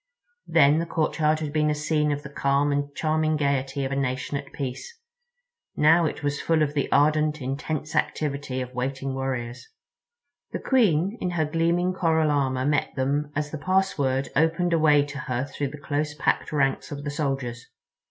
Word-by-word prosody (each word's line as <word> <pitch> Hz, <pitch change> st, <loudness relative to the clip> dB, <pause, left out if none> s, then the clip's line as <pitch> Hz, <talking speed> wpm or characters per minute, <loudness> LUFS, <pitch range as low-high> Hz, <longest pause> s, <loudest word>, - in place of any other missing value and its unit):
Then 145 Hz, +3 st, +5 dB
the 170 Hz, -, -2 dB
courtyard 155 Hz, -1 st, +1 dB
had 150 Hz, -2 st, -4 dB
been 150 Hz, -1 st, +2 dB
a 150 Hz, -, +1 dB
scene 150 Hz, 0 st, 0 dB
of 145 Hz, 0 st, -3 dB
the 140 Hz, -, -8 dB
calm 140 Hz, 0 st, +1 dB
and 145 Hz, 0 st, -1 dB
charming 155 Hz, 0 st, +1 dB
gaiety 140 Hz, -1 st, 0 dB
of 135 Hz, -, -3 dB
a -, -, -1 dB
nation 135 Hz, +1 st, -2 dB
at 140 Hz, -1 st, -5 dB
peace; 140 Hz, -, -6 dB, 0.8 s
now 165 Hz, +3 st, +5 dB
it 150 Hz, -, -3 dB
was 145 Hz, 0 st, -1 dB
full 160 Hz, -2 st, +2 dB
of 145 Hz, -1 st, -1 dB
the 145 Hz, -2 st, -1 dB
ardent, 155 Hz, +1 st, +3 dB
intense 145 Hz, +3 st, -4 dB
inactivity 140 Hz, -3 st, -1 dB
of 125 Hz, 0 st, -6 dB
waiting 130 Hz, +2 st, -3 dB
warriors. 130 Hz, -2 st, -4 dB, 0.9 s
The -, -, -2 dB
Queen 205 Hz, -, +2 dB
in 180 Hz, -, 0 dB
her 170 Hz, -3 st, 0 dB
gleaming 170 Hz, +4 st, +1 dB
coral 160 Hz, -4 st, +2 dB
armor 130 Hz, -2 st, 0 dB
met 145 Hz, +1 st, 0 dB
them 140 Hz, +2 st, -1 dB
as 150 Hz, 0 st, -2 dB
the 155 Hz, -, -5 dB
password 145 Hz, -7 st, +1 dB
opened 165 Hz, +3 st, +2 dB
a 165 Hz, -, +3 dB
way 150 Hz, -2 st, +5 dB
to 140 Hz, -1 st, -7 dB
her 125 Hz, 0 st, -2 dB
through 140 Hz, 0 st, -3 dB
the 150 Hz, -, -9 dB
close 150 Hz, +1 st, -2 dB
packed 145 Hz, -, 0 dB
ranks 140 Hz, -2 st, 0 dB
of 145 Hz, 0 st, -6 dB
the 145 Hz, -, -3 dB
soldiers. 135 Hz, -5 st, -3 dB
145 Hz, 180 wpm, -25 LUFS, 135-155 Hz, 0.9 s, Then